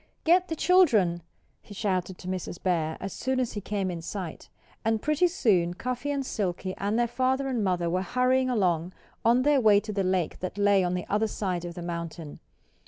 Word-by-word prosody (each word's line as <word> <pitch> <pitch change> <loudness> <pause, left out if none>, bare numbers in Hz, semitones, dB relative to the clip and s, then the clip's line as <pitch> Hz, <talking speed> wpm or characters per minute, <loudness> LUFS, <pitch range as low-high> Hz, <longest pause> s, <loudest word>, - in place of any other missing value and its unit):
"Get 360 +2 +4
the 325 - -3
children!" 230 - +4 0.4
he 205 - -12
shouted 185 -2 -1
to 180 - -10
Mrs. 185 -1 -4
Bear, 160 -4 0
as 195 -1 -5
soon 260 0 -1
as 250 -2 -1
he 205 - -4
came 200 -2 -2
in 170 -2 -5
sight. 175 -1 -6 0.3
And 225 0 +1
pretty 305 +7 +2
soon 185 - +1
Cuffy 250 +6 -3
and 280 -2 -1
Silkie 185 -4 -2
and 205 +3 0
their 240 - +3
father 260 +3 0
and 245 -5 -1
mother 180 -3 0
were 180 +2 0
hurrying 255 +4 +1
along 180 -6 0 0.3
on 240 +2 +4
their 290 -1 +4
way 210 -3 +6
to 215 0 -6
the 195 -1 0
lake 185 -3 0
that 185 +2 -5
lay 200 -1 +4
on 180 0 0
the 180 - -3
other 210 +2 +1
side 185 -4 -3
of 170 -1 -7
the 175 - -6
mountain. 170 -2 -6
200 Hz, 205 wpm, -27 LUFS, 180-250 Hz, 0.4 s, way